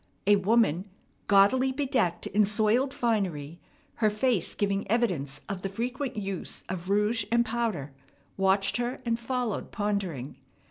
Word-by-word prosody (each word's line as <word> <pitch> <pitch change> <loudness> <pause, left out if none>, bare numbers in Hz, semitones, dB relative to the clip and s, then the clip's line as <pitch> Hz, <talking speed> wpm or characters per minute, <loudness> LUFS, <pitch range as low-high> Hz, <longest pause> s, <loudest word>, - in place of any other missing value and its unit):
A 205 +1 +6
woman, 195 -3 +2 0.4
gaudily 205 +7 +5
bedecked 255 - 0
in 210 +2 +3
soiled 215 +6 +2
finery, 180 - -1 0.4
her 215 -2 +3
face 215 -2 0
giving 200 -1 -1
evidence 175 - 0
of 195 -3 -4
the 195 - -3
frequent 245 +6 -3
use 195 -3 -5
of 185 0 -5
rouge 210 +2 +2
and 235 0 +4
powder, 220 - -2 0.4
watched 195 +2 +2
her, 245 +1 -2
and 230 0 0
followed, 245 -2 -2
pondering. 200 - -2
210 Hz, 135 wpm, -28 LUFS, 190-235 Hz, 0.4 s, A